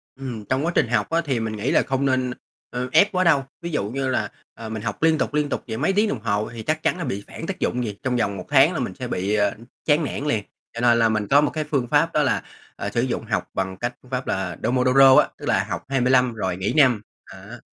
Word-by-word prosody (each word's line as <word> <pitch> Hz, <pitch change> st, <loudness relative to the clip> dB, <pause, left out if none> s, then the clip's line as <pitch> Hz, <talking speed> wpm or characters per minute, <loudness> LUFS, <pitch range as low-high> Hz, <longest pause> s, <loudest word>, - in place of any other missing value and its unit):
Ừm, 125 Hz, -6 st, -6 dB
trong 130 Hz, +4 st, +1 dB
quá 170 Hz, -, 0 dB
trình -, -, +3 dB
học -, -, 0 dB
á, 165 Hz, +1 st, +1 dB
thì 130 Hz, -5 st, 0 dB
mình 110 Hz, -1 st, -3 dB
nghĩ 105 Hz, -, -1 dB
là -, -, +4 dB
không 135 Hz, 0 st, -1 dB
nên, 130 Hz, -2 st, +1 dB, 0.4 s
ơ, 125 Hz, +1 st, -4 dB
ép 205 Hz, +7 st, +5 dB
quá 185 Hz, 0 st, +1 dB
đâu. 150 Hz, -6 st, +4 dB, 0.2 s
Ví 170 Hz, -, -4 dB
dụ 105 Hz, -9 st, -1 dB
như 135 Hz, +2 st, -2 dB
là, 130 Hz, -, -1 dB, 0.2 s
ờ, 115 Hz, -1 st, -8 dB
mình 110 Hz, -1 st, -5 dB
học 105 Hz, +6 st, -4 dB
liên 160 Hz, -1 st, +4 dB
tục, -, -, -2 dB
liên 150 Hz, -1 st, 0 dB
tục -, -, -3 dB
vậy 110 Hz, -, -4 dB
mấy 155 Hz, +9 st, +1 dB
tiếng 210 Hz, +2 st, +2 dB
đồng 130 Hz, -, -2 dB
hồ 105 Hz, -1 st, -1 dB
thì 115 Hz, -, -7 dB
chắc 155 Hz, +3 st, -1 dB
chắn -, -, +1 dB
là 175 Hz, -, -4 dB
bị 100 Hz, -7 st, -4 dB
phản -, -, -8 dB
tác -, -, -4 dB
dụng 125 Hz, -, -1 dB
liền, 105 Hz, -4 st, -3 dB
trong 130 Hz, -1 st, 0 dB
vòng 100 Hz, -4 st, 0 dB
1 -, -, -7 dB
tháng 145 Hz, +4 st, +5 dB
là 155 Hz, -, -2 dB
mình 120 Hz, -7 st, -3 dB
sẽ 125 Hz, -, -4 dB
bị, 100 Hz, 0 st, -1 dB
ờ, 105 Hz, -1 st, +2 dB, 0.3 s
chán 155 Hz, +1 st, +3 dB
nản 140 Hz, 0 st, -4 dB
liền. 110 Hz, -8 st, 0 dB, 0.3 s
Cho 115 Hz, -, -5 dB
nên 120 Hz, -1 st, +4 dB
là 115 Hz, -1 st, +4 dB
mình 110 Hz, -2 st, -1 dB
có 140 Hz, +6 st, +5 dB
một 150 Hz, -, +1 dB
cái 155 Hz, -, -2 dB
phương 140 Hz, -5 st, -1 dB
pháp 150 Hz, +4 st, +2 dB
đó 150 Hz, -, +3 dB
là, -, -, 0 dB, 0.3 s
ờ, -, -, -4 dB
sử -, -, 0 dB
dụng -, -, -2 dB
học -, -, -2 dB
bằng 95 Hz, 0 st, -3 dB
cái 120 Hz, +4 st, -2 dB
phương 125 Hz, -, -20 dB
pháp 130 Hz, 0 st, -3 dB
là 95 Hz, -3 st, -2 dB
Pomodoro 130 Hz, +2 st, +5 dB
á, -, -, +6 dB
tức -, -, -9 dB
là -, -, +2 dB
học -, -, -3 dB
25 125 Hz, -2 st, +3 dB
rồi 95 Hz, -5 st, -3 dB
nghỉ 95 Hz, +2 st, -1 dB
5, 125 Hz, -8 st, +5 dB, 0.2 s
á. 100 Hz, +5 st, -11 dB
125 Hz, 280 wpm, -23 LUFS, 110-145 Hz, 0.4 s, á